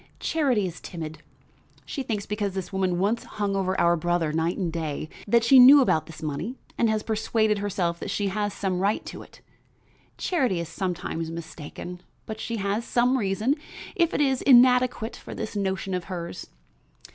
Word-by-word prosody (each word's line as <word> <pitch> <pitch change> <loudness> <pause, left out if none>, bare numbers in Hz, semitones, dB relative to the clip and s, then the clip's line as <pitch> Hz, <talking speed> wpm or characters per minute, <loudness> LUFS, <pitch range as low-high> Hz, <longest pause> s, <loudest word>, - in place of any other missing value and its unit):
"Charity 270 - +1
is 175 -2 -6
timid; 160 -2 -7 0.7
she 275 - -4
thinks 215 -6 -3
because 205 -2 -2
this 190 0 -5
woman 185 -2 0
once 210 +6 0
hung 205 -2 -3
over 190 -1 0
our 170 0 +4
brother, 170 -2 0
night 165 +2 0
and 175 -5 -2
day, 155 -2 -3 0.2
that 235 +2 +4
she 260 +3 +7
knew 270 +4 +10
about 200 - +2
this 160 -1 -11
money 155 - -3 0.2
and 230 - +2
had 215 -1 -1
persuaded 220 -1 +1
herself 180 -4 -1
that - - -5
she 200 -1 -1
has 205 +1 -1
some 190 -2 -2
right 200 +3 0
to - - -8
it. - - -16 0.8
Charity 255 - 0
is 170 -1 -4
sometimes 165 -2 -3
mistaken, 165 +2 -8 0.2
but 220 -1 -6
she 230 +1 -3
has 200 +3 -1
some 245 +2 +2
reason, 215 +2 +1 0.4
if 340 -2 +2
it - - 0
is 265 -3 +2
inadequate, 250 -3 +5
for - - -9
this 220 0 -5
notion 190 -1 -2
of 180 -1 -2
hers. 175 -3 -6
200 Hz, 180 wpm, -26 LUFS, 175-230 Hz, 0.8 s, knew